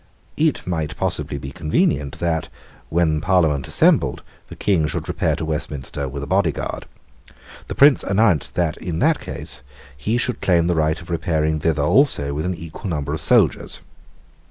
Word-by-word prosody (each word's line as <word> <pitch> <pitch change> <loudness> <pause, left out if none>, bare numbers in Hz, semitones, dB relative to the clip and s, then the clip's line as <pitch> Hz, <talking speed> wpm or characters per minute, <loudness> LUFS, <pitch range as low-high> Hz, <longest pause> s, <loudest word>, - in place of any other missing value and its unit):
It 155 -1 +1
might 80 -4 -3
possibly 70 - -2
be 70 -1 -7
convenient 75 -2 0
that, 85 -2 -1 0.4
when 80 -2 +2
the - - -7
Parliament 80 -7 +2
assembled, - - +2 0.2
the - - -10
King 90 -7 +1
should - - -4
repair 80 - 0
to 80 -1 -4
Westminster 75 -3 -4
with 70 +1 -5
a - - -3
body - - +2
guard. - - -5 0.8
The - - -5
Prince 140 0 +6
announced 95 -6 +2
that, 85 -4 0
in 85 -3 -4
that - - +2
case, 75 -1 -6 0.3
he 105 - -1
should 125 0 -1
claim 85 -3 +3
the 90 - +2
right 80 -1 +1
of 85 0 -10
repairing 80 -2 0
thither 75 -2 +1
also 75 - +3
with 75 +4 -2
an 90 - -1
equal 85 +5 -7
number 75 -3 -2
of 80 - -3
soldiers. - - +2
80 Hz, 175 wpm, -21 LUFS, 75-90 Hz, 0.8 s, Prince